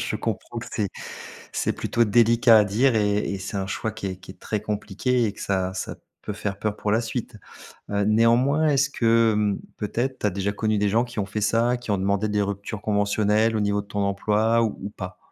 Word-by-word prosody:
Je - - -2
comprends - - -4
que - - -7
c'est - - -1 0.6
c'est - - -1
plutôt 120 - +1
délicat 115 +1 +5
à - - +5
dire 115 +6 +2
et 105 -1 +2
et 100 -1 -2
c'est 100 +1 -5
un 95 - -2
choix 110 +3 -3
qui 100 - -7
est 95 -1 -3
qui 95 0 -17
est - - -18
très 105 -2 -3
compliqué 105 +4 -1
et 105 - -2
que - - -11
ça 95 -1 -1
ça 95 - -4 0.3
peut - - -5
faire 100 -1 -4
peur 105 -1 -1
pour 105 - -2
la 110 +2 +3
suite. 115 -1 -5 0.5
Heu, 100 0 0
néanmoins 120 +8 +3
est-ce 140 -1 +2
que, 115 -3 +3
mmh, 105 -1 +1 0.2
peut-être 120 +5 -2
tu - - +1
as - - +3
déjà 100 +1 -2
connu 110 +1 0
des 105 0 +2
gens 115 +4 +3
qui 120 -1 -13
ont 100 - 0
fait 100 +2 -4
ça? 115 +3 +2
Qui 120 - -12
ont 100 - +2
demandé 100 +2 0
des 105 0 +1
ruptures 100 +1 -5
conventionnelles 105 +1 +2
au 110 - +1
niveau 100 0 +1
de 100 - -18
ton 100 -1 -2
emploi 105 +3 +2
ou 110 -2 -1
ou 100 - -3
pas? 90 -2 -8
105 Hz, 235 wpm, -24 LUFS, 100-115 Hz, 0.6 s, délicat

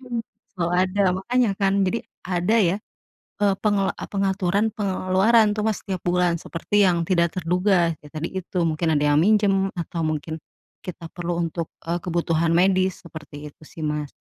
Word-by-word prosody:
mhm, 245 -3 -4 0.4
selalu 175 -1 -1
ada. 200 +2 0 0.2
Makanya, 240 +3 +1
kan. 195 -1 +3
Jadi, 230 +5 -1 0.3
ada 180 +4 +1
ya, 185 -1 +2 0.7
eee, 200 -1 +4
pengela 205 -2 +2
e - - -5
pengaturan 195 +1 +1
pengeluaran 205 +2 +2
tuh - - +1
Mas 220 -2 0
setiap 190 -2 -3
bulan, 175 -1 +2
seperti 200 +4 +1
yang 170 -2 +2
tidak 170 -2 +2
terduga. 180 -1 +2
Ya, 150 - -12
tadi 155 +2 -3
itu, 185 0 -5
mungkin 160 +1 -1
ada 145 - +1
yang - - +4
minjem, 195 -1 +3
atau 170 0 -4
mungkin 155 +1 -3 0.5
kita 175 -2 -7
perlu 175 -1 -3
untuk, 165 0 -4 0.2
eee, 170 +1 0
kebutuhan 165 -1 0
medis, 185 +1 +2
seperti 150 -2 -9
itu 150 - -31
sih, 160 - -10
Mas. 150 -1 -3
180 Hz, 170 wpm, -23 LUFS, 170-195 Hz, 0.7 s, eee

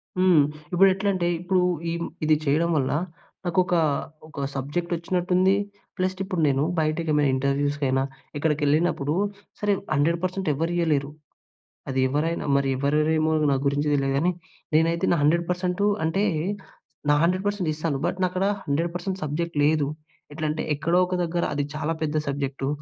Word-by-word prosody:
హ్మ్. 185 -5 +5 0.3
ఇప్పుడు 195 +2 +6
ఎట్లంటే, 190 -2 0
ఇప్పుడు 180 +1 +1 0.3
ఇ - - -1 0.3
ఇది 155 0 +5
చేయడం 155 +4 +2
వల్ల, 130 -2 0 0.5
నాకొక, 180 +1 +1 0.5
ఒక 140 -3 -4
సబ్జెక్ట్ 145 +6 -3
వచ్చినట్టు 175 +2 -2
ఉంది. 190 +1 +4 0.4
ప్లస్ 185 0 0
ఇప్పుడు 185 -3 -2
నేను, 140 0 +2 0.2
బయటకి 155 +1 0
ఏమైనా 145 -2 +3
ఇంటర్వ్యూస్‌కైనా, 140 0 0 0.3
ఎక్కడికి 150 0 0
వెళ్ళినప్పుడు, 150 -1 +1 0.5
సరే 205 -1 +2 0.2
100% 170 +4 0
ఎవరు 165 +4 -1
ఇయ్యలేరు. 150 -4 +1 0.8
అది 130 0 -1
ఎవరైనా, 155 +5 -1
మరి 140 -1 +2
ఎవరేరేమో 155 +3 +2 0.2
నా - - +3
గురించి 145 +2 0
తెలియదు 135 -1 +1
గానీ, 170 +6 +2 0.4
నేనైతే 165 +2 +2
నా - - +2
100% 180 +4 +1 0.2
అంటే, 190 +6 +1 0.9
నా 145 - +6
100% 185 0 0
ఇస్తాను. 155 -2 -2
బట్ - - -1
నా - - +4
అక్కడ, 185 +1 0 0.2
100% 175 +6 -2
సబ్జెక్ట్ 165 +3 -3
లేదు. 150 -1 +3 0.5
ఎట్లంటే, 155 0 -2
ఎక్కడో 170 +4 +1
ఒక 180 - -2
దగ్గర 170 +1 -1
అది 145 0 0
చాలా 155 +1 -1
పెద్ద 155 -1 -1
సబ్జెక్టూ, 140 -1 -2
160 Hz, 140 wpm, -25 LUFS, 145-180 Hz, 0.9 s, ఇప్పుడు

